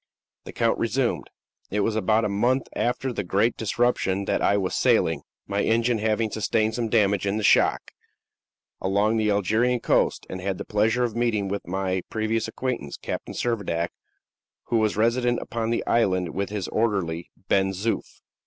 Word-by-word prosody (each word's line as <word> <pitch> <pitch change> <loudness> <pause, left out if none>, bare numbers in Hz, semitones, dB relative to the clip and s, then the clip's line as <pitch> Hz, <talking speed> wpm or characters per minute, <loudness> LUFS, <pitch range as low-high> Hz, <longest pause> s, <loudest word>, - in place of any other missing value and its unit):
The - - -7
count - - +1
resumed: - - 0 0.4
"It 105 +1 0
was 110 +2 0
about 110 +1 +2
a - - 0
month 120 +6 +1
after 125 +2 -1
the 105 - -2
great 100 +6 +1
disruption 110 -4 0
that - - 0
I 100 - +3
was 95 -2 -1
sailing - - +2 0.2
my 100 0 -1
engine 115 +1 +2
having 110 0 0
sustained 110 +1 0
some 115 -1 -2
damage 100 -3 +2
in 100 +2 0
the 110 - -2
shock - - +3 0.9
along 100 +4 +2
the 110 -1 +1
Algerian 110 +5 +2
coast, - - +1
and 95 - -6
had 95 0 -2
the 100 - -6
pleasure 110 +4 +1
of 115 -3 -2
meeting 110 -4 0
with 100 -2 -4
my 95 0 -1
previous 110 +1 -1
acquaintance, 115 - -4
Captain - - -5
Servadac, 100 -8 -1 0.8
who 115 - +2
was 110 -2 +1
resident 120 +2 +2
upon 115 -1 -3
the 115 - -1
island 95 -7 +1
with 100 0 -2
his 105 -3 -3
orderly, 95 -7 -1 0.2
Ben 95 0 +3
Zoof." 100 +4 -3
110 Hz, 170 wpm, -25 LUFS, 100-115 Hz, 0.9 s, I